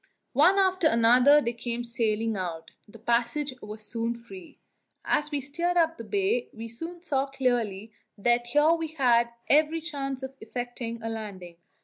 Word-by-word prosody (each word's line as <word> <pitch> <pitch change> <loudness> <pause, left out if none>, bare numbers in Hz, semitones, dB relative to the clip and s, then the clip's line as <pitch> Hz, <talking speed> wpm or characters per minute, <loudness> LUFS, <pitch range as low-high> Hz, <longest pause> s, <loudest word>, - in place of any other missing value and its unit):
One 390 +2 +5
after 375 -3 +3
another 250 +4 +6
they 235 -2 -2
came 235 0 -4
sailing 225 -2 -1
out: 170 -4 -5 0.2
the 210 - -14
passage 240 +5 0
was 210 +1 -9
soon 230 +2 -3
free. 305 +7 -12 0.5
As 300 0 +1
we 290 -2 -2
steered 340 +6 -1
up 330 -1 +2
the - - -5
bay, 405 - 0
we 230 0 -7
soon 335 +9 -7
saw 275 -5 0
clearly 240 -6 -1 0.3
that 240 +3 +1
here 295 +5 +4
we 330 -1 0
had 240 -5 +3 0.2
every 310 +2 +3
chance 275 -5 -5
of 265 0 -5
effecting 235 0 -5
a 225 - -2
landing. 195 -6 -7
245 Hz, 160 wpm, -27 LUFS, 230-300 Hz, 0.5 s, another